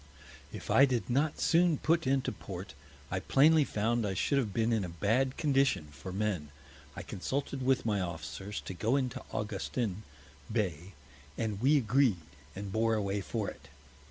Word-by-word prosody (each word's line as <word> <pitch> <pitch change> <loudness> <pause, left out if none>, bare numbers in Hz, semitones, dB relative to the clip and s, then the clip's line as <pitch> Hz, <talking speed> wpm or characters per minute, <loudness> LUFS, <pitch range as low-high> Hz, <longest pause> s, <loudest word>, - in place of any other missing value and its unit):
If - - -6
I 135 - +7
did 125 -2 -1
not 145 +4 +1
soon 170 -2 +4
put 165 -1 +1
into 135 0 +1
Port, - - -8 0.4
I 90 - 0
plainly 150 +9 +5
found 115 -1 0
I 100 -2 -1
should 140 +9 +2
have 110 -6 -1
been 115 +3 +1
in 110 -3 +1
a 90 - -4
bad 115 +10 +1
Condition, 135 - +2
for 90 +5 -8
Men; 95 -6 -2 0.5
I - - -6
consulted 135 +6 -3
with 130 -1 +2
my 105 -3 +1
Officers, 90 +4 -5
to - - -6
go 110 +8 +1
into 130 -4 -1
Augustin 105 0 -2 0.5
Bay, 95 -5 -2 0.4
and 110 -3 -2
we 145 +4 +5
agreed, 120 -6 +2 0.3
and 100 0 -5
bore 110 +2 +2
away 100 -1 -1
for 105 +1 -3
it. 70 -1 -9
110 Hz, 165 wpm, -31 LUFS, 100-135 Hz, 0.5 s, I